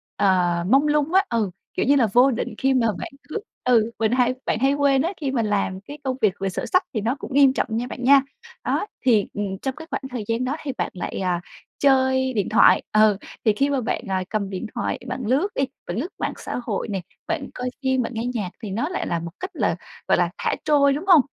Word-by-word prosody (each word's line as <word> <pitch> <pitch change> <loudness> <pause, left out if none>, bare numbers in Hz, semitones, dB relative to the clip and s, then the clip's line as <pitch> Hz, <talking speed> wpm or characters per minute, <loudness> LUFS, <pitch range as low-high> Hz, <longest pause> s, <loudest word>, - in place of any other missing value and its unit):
ờ, 180 -3 +2
mông 275 +4 +5
lung 300 +3 +1
á, 385 +1 +6
ừ, 225 -4 0 0.2
kiểu - - 0
như 285 +2 +5
là, 240 -5 +4
vô 255 +3 +6
định 235 - -3
khi 270 0 +2
mà 240 -3 +3
bạn - - -6 0.2
cứ, 435 - -2 0.2
ừ, 230 -2 +3
mình 220 0 +2
hay 250 0 +3
bạn 215 - 0
hay 270 +2 +3
quên 280 -2 +3
á, 345 +5 -1
khi 270 -2 -1
mình 230 -4 0
làm 195 -2 0
cái 290 +8 -10
công 260 -1 -2
việc 205 -4 +4
về 195 0 -1
sổ - - -4
sách, 370 -1 +2
thì 215 - -1
nó 235 +5 0
cũng 265 - -7
nghiêm 275 -2 +6
trọng - - 0
nha 235 +3 -1
bạn 245 - -7
nha. 275 +1 +7 0.4
Đó, - - 0 0.2
thì, 220 -5 +4
ừm, 200 -2 -3
trong 265 -1 -2
cái 320 +1 -10
khoảng - - -2
thời 245 -4 -4
gian 230 +2 0
đó 275 +4 -1
thì 280 - -3
bạn - - -2
lại, 180 - -4
à, 175 -1 0 0.4
chơi 260 -1 +3
điện 205 -4 0
thoại, - - +6
ờ, 215 -2 +5 0.3
thì 215 - +5
khi 275 +6 +1
mà 275 -3 0
bạn, 220 - -2
à, 190 -1 0
cầm 205 -3 -2
điện 190 +3 -4
thoại 240 - -2
bạn 250 +1 -4
lướt 270 - +2
đi, 275 - +1 0.2
bạn 175 +4 -3
lướt 285 - -1
mạng - - -1
xã - - -5
hội 215 -2 -2
nè, 195 -3 -3 0.3
bạn 330 -4 -2
coi 250 0 -3
phim, 260 -1 +2
bạn 245 - -3
nghe 225 - -2
nhạc, 205 -6 -2
thì 205 - -4
nó 240 - -1
lại 365 - -3
là 170 - -1
một 170 0 -6
cách 375 - -5
là, - - 0 0.3
gọi - - +4
là, - - +2
thả - - 0
trôi, 280 -2 +4
đúng 310 +7 -4
hông? 345 -7 +8
250 Hz, 255 wpm, -23 LUFS, 210-275 Hz, 0.4 s, hông